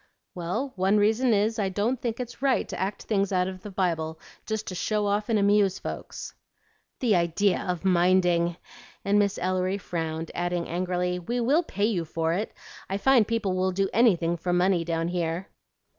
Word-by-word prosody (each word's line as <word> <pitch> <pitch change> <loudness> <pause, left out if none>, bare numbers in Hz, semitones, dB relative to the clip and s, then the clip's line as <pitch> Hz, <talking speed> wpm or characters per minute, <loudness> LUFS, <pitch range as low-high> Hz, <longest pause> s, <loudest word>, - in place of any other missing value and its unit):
"Well, 210 +10 -3
one 190 +3 +3
reason 220 +4 +3
is 215 +1 +2
I 195 -2 +1
don't 220 +6 -1
think 235 -1 -3
it's 245 0 -6
right 270 -2 +2
to - - -5
act 195 +2 -3
things 200 -2 0
out 180 -1 +2
of 185 -1 -7
the 210 - -8
Bible 165 -4 -1 0.3
just 220 -1 -2
to - - -5
show 210 +3 0
off 205 +2 0
and 225 - +3
amuse 200 -1 +3
folks." - - -7 0.7
"The 230 -6 +3
idea 175 +3 +2
of 180 0 -3
minding!" 175 -2 +3 0.5
and 200 +1 +3
Miss 200 -1 +1
Ellery 185 +1 0
frowned, 165 -3 -4
adding 175 0 -2
angrily, 180 +1 -1
"We 240 +8 -3
will 275 +8 +3
pay 205 - -2
you 205 -6 0
for 165 0 -1
it. 205 +5 -2 0.4
I 195 - -1
find 240 0 +4
people 225 -5 0
will 185 0 +1
do 195 +1 0
anything 180 -7 +3
for 175 +2 -2
money 180 0 +2
down 165 0 -1
here." 175 +1 -2
190 Hz, 185 wpm, -26 LUFS, 175-210 Hz, 0.7 s, find